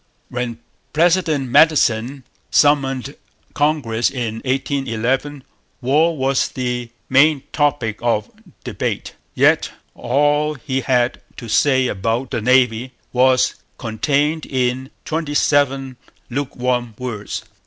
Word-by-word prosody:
When 120 -2 -3 0.4
President 160 -4 +2
Madison 135 -4 +3 0.3
summoned 140 -2 +2 0.4
Congress 145 -6 +1
in 120 -4 -3
1811 135 +1 -1 0.4
war 150 +6 +2
was 135 0 +1
the 125 -2 -3 0.2
main 140 +1 +4
topic 140 -8 0
of 115 -3 0 0.3
debate. - - -3 0.2
Yet - - +3 0.2
all 145 +4 +1
he 135 0 -3
had 125 -2 +1 0.2
to 120 - -8
say 130 +3 +3
about 115 +3 -2
the 115 - -2
Navy 125 0 +2 0.2
was 130 0 +3 0.2
contained 145 +7 -1
in 130 0 -1 0.2
twenty 155 -2 -3
seven 135 -3 +1 0.3
lukewarm 125 -3 -2
words. 110 -5 -5
130 Hz, 100 wpm, -19 LUFS, 120-145 Hz, 0.4 s, main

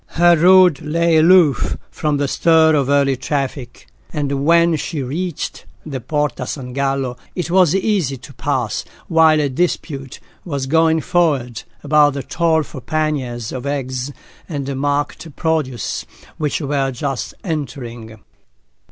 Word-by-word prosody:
Her 175 0 +6
road 180 -2 +5
lay 165 +1 +2
aloof 160 - +4
from 150 -1 -1
the 140 0 0
stir 160 +2 +4
of 140 -3 +1
early 140 -1 +3
traffic, 135 -2 -4 0.3
and 140 -3 -2
when 170 +1 +4
she 150 -1 -3
reached 160 +5 -4 0.2
the 135 -5 -5
Porta 145 -1 -2
San 125 -3 -6
Gallo, 135 -2 -1 0.2
it 175 -2 -3
was 180 -2 +4
easy 190 - 0
to 120 - -13
pass - - -2 0.2
while 160 -1 +4
a 145 - +1
dispute 140 -2 -3 0.2
was 140 -6 -3
going 160 +2 +3
forward 145 -11 0 0.2
about 145 -1 +4
the 140 - -4
toll 165 -2 +1
for 135 -3 -10
panniers 130 -6 -2
of 130 +1 -5
eggs 130 -1 -3 0.4
and 140 -3 -3
market 145 +2 -2
produce 155 -7 -2 0.3
which 150 +1 -1
were 140 -2 0
just 135 -1 -4
entering. 120 - -5
145 Hz, 135 wpm, -19 LUFS, 135-160 Hz, 0.4 s, Her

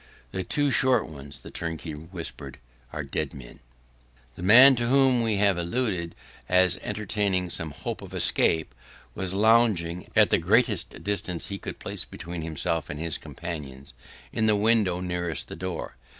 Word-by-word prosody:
'The 95 - -3
two 145 +5 +1
short 130 +1 +3
ones,' 70 -2 -10
the - - -10
turnkey 80 -1 -5
whispered, 80 +3 -7 0.3
'were - - -4
dead - - -3
men.' 65 -3 -12 0.7
The 85 - -11
man 125 +8 +8
to 120 0 0
whom 130 -1 +4
we 110 -2 +1
have 100 -3 +3
alluded 85 -2 -2 0.3
as 90 0 +4
entertaining 100 -3 -1
some 80 - -2
hopes 70 - -6
of - - -10
escape, 80 -1 +1 0.4
was 95 0 -1
lounging, 100 -6 +3
at - - +5
the - - +4
greatest - - +1
distance 95 -4 -2
he 100 0 -4
could - - -6
place - - -5
between 85 0 -7
himself 80 0 -2
and 75 - -5
his 80 -1 -2
companions, 70 -7 -5 0.4
in 110 - +1
the 105 - +4
window 105 -4 +2
nearest 90 -2 -2
to - - -20
the - - -6
door. 90 -3 -5
90 Hz, 165 wpm, -26 LUFS, 85-105 Hz, 0.7 s, man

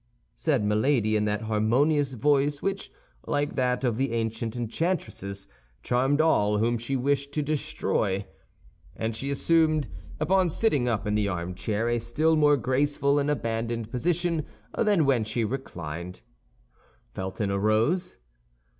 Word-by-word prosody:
said 140 -9 0
Milady, 110 +1 +2
in 105 0 +2
that 105 +1 -1
harmonious 130 +7 +2
voice 145 +3 +2
which, 195 +3 -3 0.4
like 145 0 0
that 125 -1 0
of 120 -4 +1
the 135 -2 0
ancient 115 0 -2
enchantresses, 115 - -3 0.4
charmed 135 +4 +1
all 105 -10 +3
whom 115 +3 +2
she 120 +4 -2
wished 140 +2 0
to 150 - 0
destroy. 105 -9 -1 0.7
And 110 +2 -2
she 135 +5 -4
assumed, 155 +1 +2 0.3
upon 190 -1 +3
sitting 150 - +1
up 110 -2 -1
in 105 - 0
the 105 -1 +1
armchair, 100 +5 -2
a 120 0 +1
still 150 +8 +1
more 150 -1 +4
graceful 140 +2 +1
and 145 +1 0
abandoned 115 -4 -2
position 170 +3 0 0.3
than 205 -8 +3
when 130 -5 +3
she 110 +2 -2
reclined. 90 - -6 0.9
Felton 95 +2 -3
arose. 110 - +1
125 Hz, 135 wpm, -27 LUFS, 110-145 Hz, 0.9 s, more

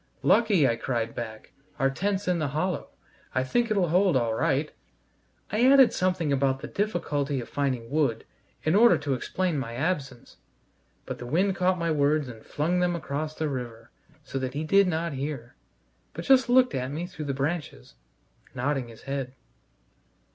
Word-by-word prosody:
"Lucky," 205 - +4
I 115 - 0
cried 115 -1 -2
back, 110 -2 -7 0.3
"our 135 0 +2
tent's 195 +6 -2
in 180 -1 +1
the 155 - 0
hollow. 185 +2 -1 0.5
I 130 - +2
think 235 - 0
it'll 195 -5 +1
hold 180 -2 +3
all 115 -3 0
right." 150 +3 0 0.8
I 215 +4 +1
added 270 -3 +7
something 180 -5 0
about 135 -1 +1
the - - -5
difficulty 150 -9 -1
of 120 - -6
finding 130 -4 -2
wood, 140 -7 0 0.4
in 155 - +2
order 235 +4 +6
to 145 -2 -2
explain 170 +5 -1
my 115 -3 -5
absence, 140 -4 -3 0.7
but - - -6
the 125 - -7
wind 185 +8 +1
caught 185 0 +2
my 170 -1 -1
words 150 -1 +2
and 110 -2 -11
flung 170 +5 -1
them 180 -1 +1
across 155 -1 -4
the 160 - -1
river, 120 -4 -6 0.3
so 135 -1 -4
that 130 0 -4
he 150 - -2
did 195 +4 +4
not 165 -1 -1
hear, 135 -3 -5 0.6
but - - -6
just 265 -2 +5
looked 255 0 +5
at 130 0 -2
me 155 +5 -4
through 155 -4 -7
the 140 -1 -2
branches, 140 - -3 0.6
nodding 130 0 -1
his 115 -1 -14
head. 135 -1 -4
150 Hz, 175 wpm, -27 LUFS, 130-180 Hz, 0.8 s, added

